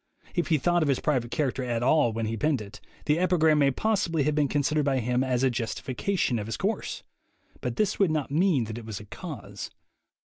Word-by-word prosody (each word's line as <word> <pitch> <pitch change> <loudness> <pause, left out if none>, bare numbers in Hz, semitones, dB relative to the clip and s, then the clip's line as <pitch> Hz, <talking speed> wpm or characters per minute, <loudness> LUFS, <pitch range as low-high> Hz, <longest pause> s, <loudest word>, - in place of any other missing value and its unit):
If 175 -3 0
he 160 - +3
thought 175 +4 +2
of 155 - +1
his 135 - +2
private 125 -6 0
character 135 -2 -1
at 120 -1 -1
all 135 -2 +4
when 115 0 -2
he 110 +1 -2
penned 145 +4 +1
it, 105 0 -10 0.2
the 150 +2 +2
epigram 160 -4 +3
may 140 -1 +5
possibly 170 -1 0
have 150 +2 +1
been 145 -1 +2
considered 150 +2 +1
by 135 -1 +1
him 125 +1 +1
as 130 -1 0
a 130 - +3
justification 125 - -1
of 105 - -5
his 115 - -3
course; 205 +4 -2 0.6
but - - -3
this 215 -3 0
would 195 -4 +4
not 155 -3 -1
mean 160 -4 +3
that 110 +1 -5
it 115 - -11
was 110 -3 -5
a 105 - -11
cause. - - -7
140 Hz, 220 wpm, -27 LUFS, 120-160 Hz, 0.6 s, may